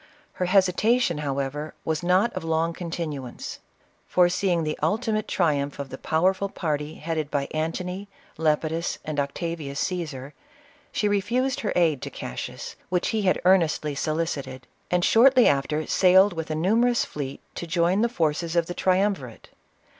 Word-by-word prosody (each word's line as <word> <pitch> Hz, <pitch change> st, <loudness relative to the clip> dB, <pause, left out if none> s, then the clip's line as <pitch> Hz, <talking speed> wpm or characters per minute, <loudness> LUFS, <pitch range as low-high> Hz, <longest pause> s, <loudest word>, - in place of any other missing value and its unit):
Her 180 Hz, -, -2 dB
hesitation, 190 Hz, +1 st, +3 dB
however, 140 Hz, +1 st, -3 dB
was 160 Hz, -1 st, -1 dB
not 185 Hz, +6 st, +2 dB
of -, -, -5 dB
frng 165 Hz, +1 st, 0 dB
continuance. 160 Hz, -7 st, -5 dB, 0.5 s
Foreseeing 175 Hz, -1 st, +2 dB
the 155 Hz, 0 st, -2 dB
ultimate 215 Hz, +6 st, 0 dB
triumph 145 Hz, -5 st, 0 dB
of 140 Hz, -1 st, -5 dB
the 130 Hz, -, -7 dB
powerful 190 Hz, +5 st, +1 dB
party 150 Hz, -4 st, -3 dB
headed 155 Hz, -2 st, -3 dB
by 140 Hz, -2 st, -1 dB
Antony, 180 Hz, +5 st, -3 dB, 0.3 s
Lepidus, 160 Hz, +2 st, 0 dB
and 155 Hz, -2 st, -2 dB
Octavius 145 Hz, 0 st, -3 dB
Caesar, 150 Hz, -7 st, -4 dB, 0.6 s
she 210 Hz, -, 0 dB
refused 235 Hz, +6 st, 0 dB
her 210 Hz, -, -2 dB
aid 160 Hz, -6 st, +2 dB
to -, -, -5 dB
Cassius, 60 Hz, -, -6 dB
which 180 Hz, 0 st, 0 dB
he 220 Hz, -, 0 dB
had 185 Hz, -2 st, +2 dB
earnestly 165 Hz, -5 st, +3 dB
so 155 Hz, +2 st, -1 dB
licited, 140 Hz, -6 st, -3 dB, 0.3 s
and 180 Hz, 0 st, +2 dB
shortly 255 Hz, +2 st, +6 dB
after 150 Hz, +2 st, +1 dB
sailed 190 Hz, +1 st, +5 dB
with 165 Hz, -2 st, -5 dB
a 155 Hz, -, -1 dB
numerous 230 Hz, +9 st, +2 dB
fleet 140 Hz, -2 st, -6 dB
to 170 Hz, -, -6 dB
join 175 Hz, +4 st, +2 dB
the 235 Hz, -, +2 dB
forces 165 Hz, -4 st, -1 dB
of 170 Hz, -1 st, +3 dB
the 175 Hz, -, -5 dB
Triumvirate. 185 Hz, -, 0 dB
170 Hz, 150 wpm, -25 LUFS, 150-190 Hz, 0.6 s, shortly